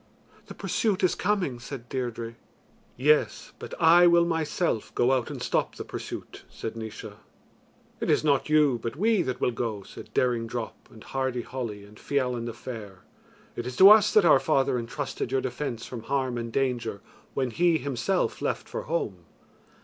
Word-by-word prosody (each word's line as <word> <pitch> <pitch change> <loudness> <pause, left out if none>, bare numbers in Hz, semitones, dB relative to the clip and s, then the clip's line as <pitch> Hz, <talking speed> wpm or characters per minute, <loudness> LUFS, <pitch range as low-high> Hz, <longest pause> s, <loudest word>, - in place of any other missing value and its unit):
"The - - -9
pursuit 210 -5 0
is 185 - +4
coming," 185 -12 -1
said 125 0 -8
Deirdre. 120 -3 -4 0.6
"Yes, 150 +4 +2
but - - -7
I 170 +2 +7
will 170 0 +5
myself 165 - -1
go 120 +2 +3
out 130 -3 +1
and - - -6
stop - - 0
the - - -7
pursuit," - - -7
said 115 - -6
Naois. 110 -2 -7 0.9
"It - - -2
is - - +3
not 145 -1 +2
you, 150 -5 +4
but 115 +2 -4
we 215 +4 +2
that 130 -5 -3
will 125 - +1
go," 115 -4 -3
said - - -11
Daring 120 -2 +1
Drop, 115 -1 -6
and 110 - -14
Hardy 130 -2 -2
Holly, 115 -6 -5
and 105 +1 -15
Fiallan 125 -4 -1
the 115 - -4
Fair; 110 -6 -9 0.5
"it 120 - -4
is 125 - -5
to 195 +8 +9
us 215 -1 +7
that 210 -4 +6
our 155 -5 +7
father 135 -2 +1
entrusted 125 +1 -4
your 135 0 +1
defence 125 -2 -4
from 120 -3 -7
harm 130 0 -1
and 115 -1 -4
danger 120 -6 -1 0.3
when 130 -2 0
he 170 +3 +3
himself 130 -5 -1
left - - -2
for - - -4
home." 100 - -3
130 Hz, 175 wpm, -27 LUFS, 115-150 Hz, 0.9 s, to